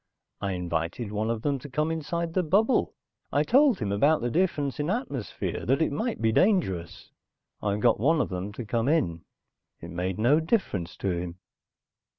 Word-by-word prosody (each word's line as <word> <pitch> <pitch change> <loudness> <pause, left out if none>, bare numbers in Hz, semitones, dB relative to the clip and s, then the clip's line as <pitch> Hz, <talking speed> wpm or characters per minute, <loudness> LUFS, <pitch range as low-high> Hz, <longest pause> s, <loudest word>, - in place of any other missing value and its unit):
I 100 -1 -1
invited 90 +4 -3
one 105 +1 -1
of 115 -1 -2
them 140 -2 0
to 145 - -10
come 155 +4 0
inside 165 +1 -3
the 185 - +2
bubble. 200 - +2 0.4
I - - +3
told 270 -4 +4
him 105 -3 -2
about 145 +10 +3
the 120 0 -1
difference 150 -5 0
in 145 +2 -1
atmosphere, 180 - -3
that 135 +3 +3
it 160 - +1
might 225 - -2
be 110 -1 +2
dangerous. 110 - +1 0.5
I 100 -1 0
got 105 - +3
one 155 +8 +3
of - - 0
them 95 +2 -4
to 120 +2 -6
come 115 +3 0
in. 130 - +1 0.6
It 85 - -9
made 90 +1 -2
no 125 +8 +4
difference 160 - -1
to 95 - -1
him." 85 0 -3
125 Hz, 180 wpm, -27 LUFS, 100-160 Hz, 0.6 s, told